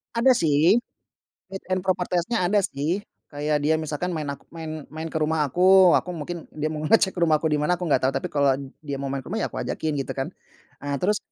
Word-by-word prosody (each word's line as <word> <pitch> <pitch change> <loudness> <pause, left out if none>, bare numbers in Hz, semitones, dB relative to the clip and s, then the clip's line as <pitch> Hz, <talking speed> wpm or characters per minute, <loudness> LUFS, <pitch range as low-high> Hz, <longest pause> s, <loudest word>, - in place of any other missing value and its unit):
Ada, 240 +3 +5
sih. 160 +7 +4 0.7
Fit 195 0 -7
and 185 - +1
proper 185 -2 0
test-nya, 180 +3 0
ada, 205 +2 +3
sih. 155 +6 -1 0.3
Kayak 150 +1 -1
dia 160 +2 +3
misalkan, 160 +3 -3
maen 150 -2 -3
aku 140 - -12
maen 160 -1 -6 0.2
maen 160 +1 -6
ke 160 - 0
rumah 155 0 +1
aku, 185 +4 +6
aku 180 - -6
mungkin 165 +3 -5 0.2
dia 155 0 -1
mau 155 - -4
ngecek 205 -4 +4
rumah 160 -2 +4
aku 160 +1 -1
di 150 - +2
mana, 180 +4 +1
aku 180 - -5
nggak 145 - +3
tau, - - 0
tapi 135 - -2
kalau 140 -2 +3 0.2
dia 140 -3 -5
mau 140 - -3
maen 135 -1 -2
ke - - -10
rumah, 215 - -2
ya, - - +1
aku - - -6
ajakin, 155 - -2
gitu, 135 - -3
kan. 135 0 -2 0.5
Ah, 145 0 -2
terus 210 +3 +2
160 Hz, 235 wpm, -24 LUFS, 150-180 Hz, 0.7 s, aku